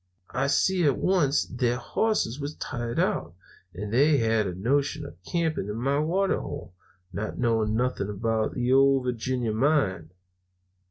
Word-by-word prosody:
I 135 +2 0
see 185 +5 +2
at 140 - +3
once 165 -7 +2
their 120 0 -1
hosses 140 - -1
was 145 +1 -5
tired 120 -1 -4
out, 85 +2 -1 0.4
and 105 +4 -6
they 145 +4 +4
had 110 -3 +1
a 90 - -4
notion 140 +8 0
of 90 -10 -12
camping 160 - -1
at 105 - -3
my 135 +5 0
water 185 +6 +1
hole, 90 - -7 0.4
not 105 +1 -4
knowing 110 -3 +1
nothing 120 -4 -1
about 110 +2 -1
the 125 +1 +1
Ole 135 0 +5
Virginia 125 -1 -1
mine. 110 - +1
125 Hz, 155 wpm, -26 LUFS, 110-145 Hz, 0.4 s, Ole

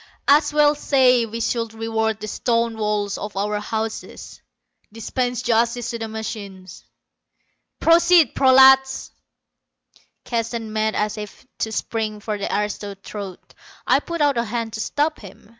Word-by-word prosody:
As 290 +3 +4
well 295 0 +4
say 255 -5 +3
we 225 +1 -6
should 230 -1 -2
reward 220 -1 -1
the 215 - -6
stone 230 +1 0
walls 210 -2 -2
of 210 -1 -7
our 210 +1 -1
houses; 220 +1 -5 0.5
dispense 245 +3 -3
justice 235 0 +1
to 235 - -5
the 225 - -4
machines. 210 -4 -8 1.0
Proceed, 340 0 +5
prolats!" 265 0 +5 1.1
Keston 230 -2 -3
made 215 0 0
as 210 0 -1
if 210 +4 -9
to 220 - -2
spring 220 -1 -3
for 210 0 -4
the 200 - -3
aristo's 205 -1 -3
throat. 200 -4 -9 0.3
I - - +4
put 335 -2 -5
out 285 -4 +3
a - - +1
hand 230 0 -4
to 220 - -5
stop 295 +7 -1
him. 200 0 -14
225 Hz, 140 wpm, -21 LUFS, 210-250 Hz, 1.1 s, Proceed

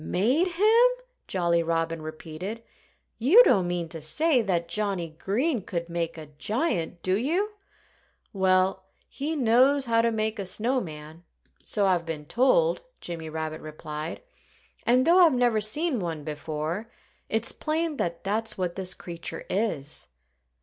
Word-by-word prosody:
"Made 250 - +2
him!" 440 +7 +5 0.4
Jolly 170 -2 +1
Robin 165 0 -1
repeated. 160 +8 -7 0.6
"You 330 - +8
don't 185 - +3
mean 175 -1 -2
to 160 -1 -7
say 275 - +2
that 175 -5 -1
Johnnie 190 -2 -1
Green 245 +6 0
could 170 -2 -4
make 170 -1 -3
a 155 -2 -9
giant, 205 - -1
do 185 0 +2
you?" 340 - 0 0.8
"Well, 190 -1 +2 0.2
he 305 +4 -3
knows 265 +2 +4
how 230 -1 +3
to 230 0 +2
make 220 0 -1
a 200 - -2
snow 240 +8 0
man 155 0 -9 0.4
so 205 -2 0
I've 175 -3 +1
been 155 -2 -5
told," 480 - +3 0.2
Jimmy 165 -2 -5
Rabbit 155 0 -4
replied. 155 - -6 0.6
"And 250 +2 +4
though 345 +3 +6
I've 335 -5 +7
never 240 -3 +2
seen 275 +6 +2
one 165 -5 -4
before, 155 +7 -4 0.4
it's 225 +3 +1
plain 315 0 -2
that 170 -6 -2
that's 215 +2 -1
what 180 -2 -1
this 185 -1 -3
creature 170 -1 -6
is." 165 - -2
190 Hz, 145 wpm, -26 LUFS, 165-250 Hz, 0.8 s, You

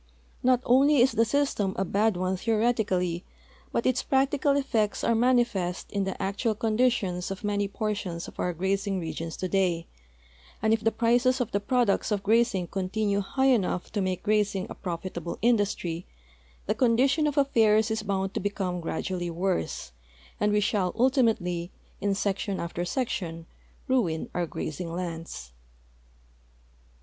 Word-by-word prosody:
Not 250 0 +3
only 275 +4 +5
is 255 +2 +5
the 230 - +3
system 220 -6 0
a 190 - 0
bad 205 +1 +1
one 185 +1 0
theo 225 +4 0
retically, 190 -7 +1 0.5
but 235 - -1
its 255 -1 +2
practical 275 +1 +2
effects 225 -7 0
are 235 - +3
manifest 230 -7 +1
in 200 -1 0
the 190 - -4
actual 210 +3 -1
con 220 0 -1
ditions 215 -8 +1
of 195 +1 -6
many 205 -1 0
portions 200 -4 -3
of - - -13
our 180 - 0
grazing 195 +3 -1
regions 165 0 -5
today, 185 -3 0 0.7
and 220 +1 +2
if 225 0 0
the 225 - +3
])rices 245 +3 +3
of 245 - -1
the 200 - +1
])roducts 240 -1 +1
of 205 -1 0
grazing 220 -4 +2
continue 200 +3 -1
high 265 +7 +2
enough 185 -5 -1
to 205 - -1
make 185 -1 -2
grazing 205 -3 +1
a - - -3
profitable 175 -1 -5
industiy, 200 -7 +1 0.6
the - - +1
condition 265 +6 +3
of 295 0 -2
affairs 220 -5 +4
is 220 0 -1
hound 195 -2 -2
to - - -1
become 185 -3 -2
gradually 175 +2 -3
worse, 175 - -2 0.5
and 210 0 +2
we 210 0 +3
shall 195 -3 0
ultimatel}^ 225 - +1 0.3
in 200 -1 +1
section 200 0 -1
after 170 +1 -3
section, 175 -8 -3 0.4
ruin 220 - 0
our 175 -1 -1
grazing 165 +2 -5
lands. 165 - -5
205 Hz, 155 wpm, -27 LUFS, 180-235 Hz, 0.7 s, only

